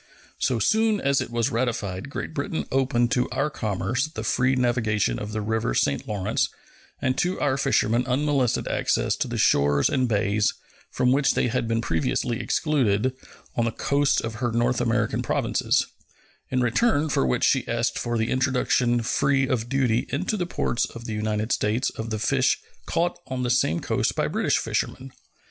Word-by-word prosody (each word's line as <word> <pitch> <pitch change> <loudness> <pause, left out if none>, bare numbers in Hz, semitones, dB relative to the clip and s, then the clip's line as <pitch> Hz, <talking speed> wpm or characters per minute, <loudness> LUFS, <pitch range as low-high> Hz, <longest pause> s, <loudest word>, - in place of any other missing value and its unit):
So 125 - +1
soon 220 - +2
as 140 -3 +1
it - - -4
was 120 -1 0
ratified 115 -3 -2
Great 160 - -5
Britain 150 +2 -3
opened 130 -3 +1
to 125 0 +1
our 150 +2 -1
commerce 110 +5 -1
the 115 -8 -7
free 125 +4 +2
navigation 110 - +1
of 105 - -5
the 110 0 -2
river 110 - -1
St. 70 - 0
Lawrence 100 -3 0 0.5
and 130 0 0
to 180 +2 0
our 140 -2 +1
fishermen 125 -2 +1
unmolested 135 -1 +1
access - - 0
to - - -1
the - - -4
shores 70 0 +3
and 130 -2 +1
bays, 105 0 +1 0.3
from 125 0 +1
which 135 +1 +2
they 125 - +1
had 115 -1 -1
been 115 0 0
previously 115 +6 -1
excluded, 130 -5 +1 0.4
on 120 - +1
the 115 - 0
coasts 140 +4 +1
of 115 0 -5
her 120 -2 0
North 120 +2 +1
American 115 -2 0
Provinces; - - +1 0.6
in 130 -1 0
return 145 - +2
for 140 - +1
which 65 -1 0
she - - +2
asked - - -1
for 120 0 -1
the 110 0 -1
introduction 125 -2 +1
free 135 +3 +1
of 120 -2 -1
duty 125 -3 +1
into 205 +4 -1
the 180 -4 -2
ports 120 - 0
of 115 0 -10
the 110 - -4
United 105 +1 -2
States 115 +5 +1
of 110 0 -6
the 110 - -2
fish 130 +4 +2 0.3
caught 170 +1 0
on 130 -1 -3
the 120 - 0
same 85 -10 +2
coast - - 0
by - - 0
British - - +1
fishermen. 135 0 -3
120 Hz, 180 wpm, -25 LUFS, 110-135 Hz, 0.6 s, shores